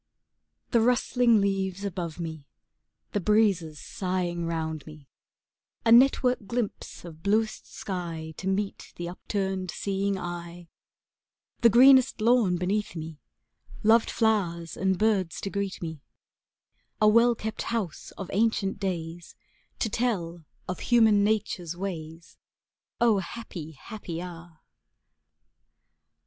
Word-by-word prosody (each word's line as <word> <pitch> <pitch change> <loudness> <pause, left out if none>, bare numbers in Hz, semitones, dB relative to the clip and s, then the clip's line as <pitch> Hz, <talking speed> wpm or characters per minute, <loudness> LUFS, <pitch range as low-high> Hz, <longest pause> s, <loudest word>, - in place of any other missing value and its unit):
The 235 - +4
rustling 240 -1 +3
leaves 195 -1 -1
above 175 -4 -4
me, 160 -4 -6 0.6
The 205 - 0
breezes 195 -7 +2
sighing 175 -2 -2
round 160 -2 -3
me, 150 -2 -12 0.8
A 225 - +4
network 250 -2 +5
glimpse 235 -6 -4
of 160 -2 -11
bluest 215 +3 0
sky 165 -4 -5
To 190 - -5
meet 195 +1 -2
the 175 - -5
upturned 190 +1 -3
seeing 195 +2 -1
eye, 175 -1 -7 0.9
The 235 - +6
greenest 260 +2 +6
lawn 220 -5 +3
beneath 190 +2 -1
me, 160 -2 -7 0.6
Loved 225 +2 +5
flowers 175 -7 0
and 190 0 +1
birds 200 -6 +1
to 195 - -4
greet 200 -3 -3
me, 160 -3 -6 1.0
A 215 - +5
well 230 +2 +5
kept 220 0 -5
house 220 -9 -3
of 195 - -5
ancient 205 -2 +1
days 175 -3 -4 0.4
To - - 0
tell 180 -8 -2 0.2
of 185 - -4
human 220 -4 +4
nature's 185 -5 -1
ways, 165 -3 -7 0.6
Oh 230 -4 +4
happy, 185 -7 -7
happy 170 +1 -7
hour! 170 -2 -9
190 Hz, 115 wpm, -27 LUFS, 170-220 Hz, 1.0 s, The